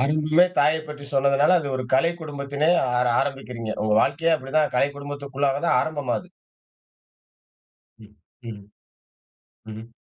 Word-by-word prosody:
ஆரம்பமே 155 +4 +3
தாயைப் 155 +2 +2
பற்றி 145 -1 -9
சொன்னதனால 140 +5 +3
அது 145 - -5
ஒரு 130 - -4
கலை 165 +6 +3
குடும்பத்திலே 145 0 -3 0.3
ஆர 125 0 +2
ஆரம்பிக்கிறீங்க, 125 -5 -5
உங்க 105 - 0
வாழ்க்கையே 160 +6 +1
அப்படி 135 -2 -11
தான் 150 - +1
கலை 140 - +3
குடும்பத்திற்குள்ளாக 140 -1 -3
தான் - - +3
ஆரம்பமாது. 150 +2 -3 1.8
ம் 105 - -18 0.4
ம். 100 -2 -10 1.2
ம்ஹ். 115 - -11
140 Hz, 125 wpm, -23 LUFS, 135-150 Hz, 1.8 s, ஆரம்பமே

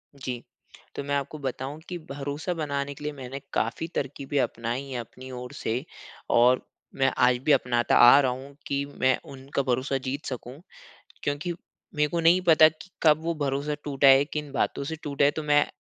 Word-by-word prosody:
जी। 125 -3 -5 0.5
तो 140 - -4
मैं 140 0 -1
आपको 140 +2 -3
बताऊँ 135 +2 -4
कि 180 - -4
भरोसा 145 +5 -3
बनाने 140 -3 -3
के 145 - -12
लिए 150 0 -3
मैंने 135 0 -7
काफ़ी 115 +9 -1
तरकीबें 140 +1 -2
अपनाई 120 +3 -2
है 125 -2 -3
अपनी 130 +3 -10
ओर 125 0 -7
से 120 +5 -2 0.5
और 125 +2 +5 0.3
मैं 135 0 +2
आज 125 0 +4
भी 155 - +4
अपनाता 120 -3 +2
आ 120 +4 +9
रहा 130 -2 +1
हूँ 135 +2 -8
कि 140 0 0 0.2
मैं 130 -1 +3
उनका 135 +1 -3
भरोसा 130 +2 0
जीत 140 +3 -3
सकूँ। 130 +2 -6 0.6
क्योंकि 145 +5 -2 0.4
मेरे 150 0 +2
को 170 +1 -1
नहीं 170 +3 +5
पता 155 -1 +8
कि 160 +4 -13
कब 155 -1 +5
वो 170 0 -1
भरोसा 145 0 -1
टूटा 140 -1 +3
है, 135 +1 +7
किन 150 -1 -5
बातों 140 - -1
से 160 +3 -4
टूटा 140 -1 +1
है 145 - +5
तो 155 - -5
मैं 145 0 +3
140 Hz, 190 wpm, -26 LUFS, 130-150 Hz, 0.6 s, आ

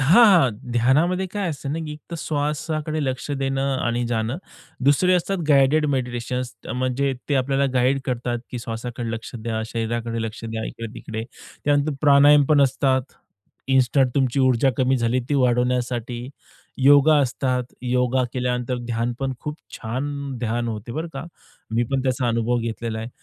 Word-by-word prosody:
हां, 170 - +7
हां. 170 -10 +5 0.2
ध्यानामध्ये 155 +11 +2
काय 195 -1 -3
असते 140 -2 -6
ना, 155 +3 -2
की 155 -2 -5
एकतर 155 +3 -8
श्वासाकडे 155 +1 -2
लक्ष 130 +2 -3
देणं 135 -1 0
आणि 120 +1 0
जाणं. 115 +4 -1 0.5
दुसरे 180 +6 +4
असतात 190 +2 0
गाईडेड 145 +2 +4
मेडिटेशन्स. 125 0 -3 0.2
म्हणजे 130 +2 0 0.2
ते 145 - +1
आपल्याला 135 +1 +2
गाईड 130 +2 +2
करतात, 120 -1 -2
की 125 - -4
श्वासाकडे 115 +1 -5
लक्ष 115 +1 -6
द्या. 110 -1 -3
शरीराकडे 115 0 -3
लक्ष 115 0 -6
द्या, 110 0 -4
इकडे-तिकडे. 115 -1 -6 0.4
त्यानंतर 145 +1 +2
प्राणायाम 145 0 +6
पण 150 -2 +5
असतात. 130 0 +2 0.7
इन्स्टंट 130 0 +3
तुमची 135 -1 +1
ऊर्जा 130 +1 +3
कमी 130 +1 +2
झाली 120 +1 +1
ती 145 - +1
वाढवण्यासाठी. 125 -1 0 0.5
योगा 145 +2 +7
असतात. 130 -1 0 0.2
योगा 125 +1 +1
केल्यानंतर 125 0 -1
ध्यान 120 +1 -1
पण 135 -1 -1
खूप 150 +1 -5 0.2
छान 125 +5 -3 0.3
ध्यान 120 0 -1
होते 110 +1 -5
बरं 160 +5 -3
का. 135 - -6 0.5
मी 115 +1 +2
पण 135 -1 +1
त्याचा 130 -1 0
अनुभव 115 +1 +1
घेतलेला 115 -1 -3
आहे, 115 - -5
130 Hz, 150 wpm, -23 LUFS, 120-140 Hz, 0.7 s, हां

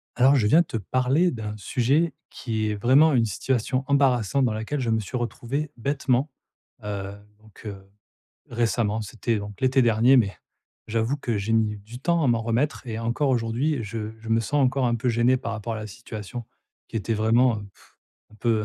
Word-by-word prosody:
Alors, 130 +3 +5
je 115 -6 +2
viens 155 +11 +6
te 160 - -5
parler 130 - +1
d'un 105 -3 -5
sujet 140 +9 +1 0.2
qui 110 -3 -3
est 105 - -1
vraiment 135 +8 +5
une 120 -3 +4
situation 130 +4 -1
embarrassante 135 -2 +2
dans 120 - +1
laquelle 110 +7 -3
je 120 - -1
me 110 - +2
suis 110 +4 -6
retrouvé, 125 +5 -3
bêtement, 135 +2 0 0.5
heu. 100 -1 -5 0.2
Donc, 110 -1 -18
heu, 95 -2 -8 0.6
récemment 115 -2 0
c'était 115 +2 -2
donc, 105 -1 -8
l'été 130 0 +3
dernier 120 +3 +5
mais, 100 -6 +2 0.5
j'avoue 115 +4 0
que 120 -5 -2
j'ai 100 +3 -2
mis 110 -2 +2
du 110 +4 -11
temps 170 +4 +1
à - - +3
m'en 120 -2 +2
remettre 120 +5 -1
et 110 -2 -4
encore 120 +5 0
aujourd'hui, 125 +4 0
je 110 +1 -5
je 110 - -10
me 115 +1 +3
sens 140 +6 +1
encore 130 0 +1
un 120 - +1
peu 120 +2 -1
gêné 120 +2 +3
par 115 - -4
rapport 110 +1 -4
à - - -4
la 105 0 -5
situation 110 +1 -8 0.4
qui - - -6
était 115 +1 -1
vraiment, 115 +3 +3
heu, 105 - -8
pff, - - -24 0.3
un - - -16
peu 110 -1 +1
115 Hz, 195 wpm, -25 LUFS, 110-130 Hz, 0.6 s, viens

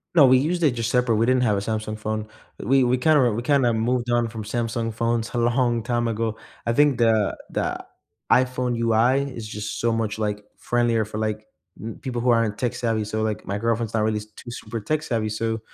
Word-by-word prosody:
No, 150 -5 +8
we 130 0 +6
used 165 +7 0
it 150 - +5
just 115 -1 -2
separate, 125 -2 +2
we 110 +2 +2
didn't 130 0 +3
have 105 -4 +2
a - - -1
Samsung 110 0 -3
phone. 110 0 -3 0.3
We 135 +4 +3
we 125 +1 +2
kinda 155 +4 +4
r 120 -3 +3
we 115 - -2
kinda 130 -1 +3
moved 120 +2 0
on 120 -1 +2
from 110 -1 -6
Samsung 115 +1 -2
phones 115 0 -1
a - - -2
long 120 0 +1
time 120 0 0
ago. 110 0 -2 0.3
I 115 - +1
think 145 -1 +4
the 110 -4 +2
the - - -3 0.4
iPhone 125 -1 +2
UI 115 +3 +3
is 115 -3 -7
just 105 0 -5
so 115 - +2
much, 110 -2 -1
like, 105 -1 -2 0.2
friendlier 120 -2 +1
for, 105 +1 -7
like, 110 0 -3 0.3
n 110 +1 -6
people 125 -3 -3
who 125 - +1
aren't 115 -3 +2
tech-savvy, 115 -2 -1
so, 110 +1 -3
like, 110 -1 -2
my 100 - -2
girlfriend's 115 0 -1
not 110 -1 +1
really 110 0 0
too 105 +3 -12
super 115 -1 -6
tech-savvy, 115 -2 -1
so 110 +1 -2
115 Hz, 215 wpm, -23 LUFS, 110-125 Hz, 0.4 s, No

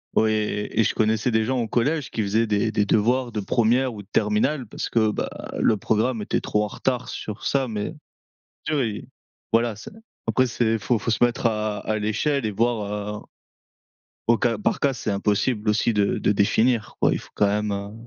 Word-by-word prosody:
Ouais 110 0 +3
et 105 0 -2
et - - +4
je - - +1
connaissais 110 +2 +1
des 110 -1 +2
gens 130 +2 0
au 115 - -1
collège 145 +5 0
qui 110 - -1
faisaient 110 +3 +1
des 105 0 +1
des 105 -1 +1
devoirs 120 +5 +2
de 110 - -3
1re 120 +5 +2
ou 105 - -8
de - - -26
terminale 110 +6 +1
parce - - -5
que 110 -2 +2
bah, 105 - -2 0.3
le 110 - +3
programme 110 +3 0
était - - -1
trop 105 - 0
en - - -3
retard 125 +4 -2
sur 105 -1 -6
ça. 135 -2 +1
Mais 105 +7 -4 0.8
oui, 125 -9 -1 0.4
voilà, 115 0 +3
c'est 110 - -10 0.4
après, 130 - +3
c'est 115 -2 0
faut 115 +3 0
faut 115 - -2
se 115 - +3
mettre 120 0 0
à 105 -2 0
à 110 +1 -2
l'échelle 115 +6 0
et 110 - 0
voir, 105 -1 -2
heu - - -20 1.0
au 115 0 +5
cas 115 -1 +1
par 105 - 0
cas, 140 -1 +2
c'est 115 -3 -3
impossible 105 +2 0
aussi 105 +2 +2
de 100 -1 +1
de - - +2
définir, 110 +3 +2
quoi. - - +3
Il - - -2
faut - - -15
quand 105 - +3
même, 105 +1 0
heu 100 0 -4
110 Hz, 205 wpm, -24 LUFS, 105-120 Hz, 1.0 s, au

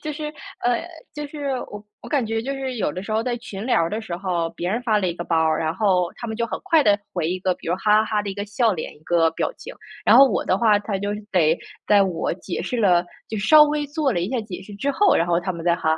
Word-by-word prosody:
就 305 - -3
是， 300 +1 -5 0.3
呃 240 -1 +1 0.3
就 295 0 -5
是 285 -1 -5 0.2
我 205 0 -9 0.2
我 - - -10
感 280 -6 +1
觉 225 +1 -1
就 275 +3 -3
是 265 -2 -4
有 205 - 0
的 180 +5 -6
时 215 +2 -5
候 220 - +1
在 245 0 -2
群 215 -4 -7
聊 250 - +3
儿 165 - -1
的 215 - -2
时 185 -6 -5
候， 175 -3 -1
别 175 - -3
人 230 +5 0
发 220 -4 +2
了 190 -3 0
一 170 - -1
个 175 - -5
包 165 - 0
儿， 160 -1 +2
然 160 0 -1
后 185 -5 +2
他 235 - -6
们 220 - -4
就 235 +1 -1
很 - - -4
快 320 -2 +4
地 205 -5 +4
回 170 -3 -1
一 185 +2 -2
个， 185 0 0
比 - - -14
如 175 - +2
哈 210 +3 +3
哈 - - -3
哈 210 -1 0
的 200 - -4
一 - - -6
个 205 +1 -4
笑 220 +2 +1
脸、 160 -4 -5
一 - - -20
个 165 0 +2
表 - - -2
情。 - - -9 0.3
然 - - +7
后 275 - +10
我 - - 0
的 185 - +2
话， 215 -1 +4
他 205 -1 -3
就 205 +1 -2 0.2
得 165 -4 +3 0.3
在 205 -1 +5
我 180 -3 -2
解 180 0 -5
释 250 - -3
了 180 -4 +4 0.2
就 220 - -4
稍 300 +9 +7
微 295 0 -1
做 290 0 0
了 175 - 0
一 180 +5 -2
下 255 - 0
解 190 -4 -8
释 205 +1 -11
之 275 +8 -1
后， 405 +8 +3
然 170 - +2
后 170 -1 +2
他 185 +2 -3
们 170 -1 -7
再 170 0 +3
哈 160 - 0
205 Hz, 320 characters per minute, -22 LUFS, 180-245 Hz, 0.3 s, 后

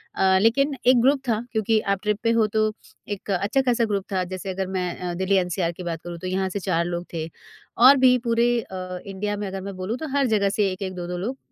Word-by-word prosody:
अ, 190 0 +4
लेकिन 275 +6 +3
एक 250 -1 +6
ग्रुप 270 +2 +3
था 220 -1 +1
क्योंकि 220 0 +2 0.2
आप 190 - -16
ट्रिप 210 0 0
पे 230 - +3
हो 215 - +4
तो 215 0 +3 0.5
एक 200 - -7
अच्छा 200 +8 +1
खासा 245 -3 +2
ग्रुप 200 -3 -2
था 185 -1 +1
जैसे 190 +1 -6
अगर 190 0 -3
मैं 180 -1 -1
अ, 180 -1 -3
दिल्ली 190 +3 0
एनसीआर 180 -1 0
की 180 - -9
बात 165 -2 -4
करूँ 175 -1 -6
तो 185 - -5
यहाँ 190 +1 -1
से 200 +2 -3
4 170 -3 0
लोग 175 0 -3
थे। 160 -1 -3 0.5
और 260 +4 +8
भी 250 0 +6
पूरे 235 +1 +3
अ, 185 -3 -7
इंडिया 205 +1 -3
में 205 - -3
अगर 190 0 -5
मैं 195 0 -6
बोलूँ 190 +6 -3
तो 315 - -5
हर 275 - +3
जगह 205 -3 +2
से 200 -1 +1
1-1 185 0 -5
2-2 175 0 -4
लोग 240 +9 -3
195 Hz, 245 wpm, -24 LUFS, 185-225 Hz, 0.5 s, और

